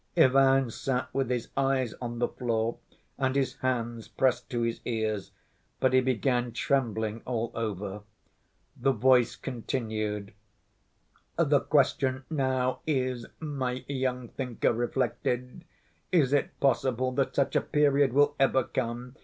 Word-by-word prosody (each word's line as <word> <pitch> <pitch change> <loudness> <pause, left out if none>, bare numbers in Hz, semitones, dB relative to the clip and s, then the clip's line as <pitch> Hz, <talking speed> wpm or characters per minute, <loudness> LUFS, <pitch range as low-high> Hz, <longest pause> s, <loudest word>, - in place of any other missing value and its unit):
Ivan 135 -1 +5
sat 125 +2 -2
with 135 -2 0
his 125 -2 -2
eyes 135 -3 +1
on 120 -1 -4
the 120 - +1
floor, 115 -1 -2 0.4
and 130 -1 +1
his 135 -2 0
hands 120 -3 -2
pressed 130 -2 0
to 120 -3 -1
his 115 0 -2
ears, 110 -4 -2 0.5
but 130 -1 +2
he 130 - +6
began 125 -1 0
trembling 115 -5 0
all 120 -2 -2
over. 105 -2 -4 0.7
The 135 +2 +1
voice 125 +1 +4
continued. 110 -5 -3 1.0
"The - - +4
question 130 -1 +1
now 130 -3 0
is, 130 -5 -1
my 130 -5 -3
young 130 -3 -2
thinker 125 -3 -1
reflected, 125 +1 -2 0.5
is 145 -7 +3
it 145 - 0
possible 130 -1 +1
that 135 +1 -1
such 140 - +1
a - - +4
period 145 -2 +3
will 145 +3 +4
ever 135 -1 +3
come? 125 +1 -4
125 Hz, 130 wpm, -28 LUFS, 115-135 Hz, 1.0 s, he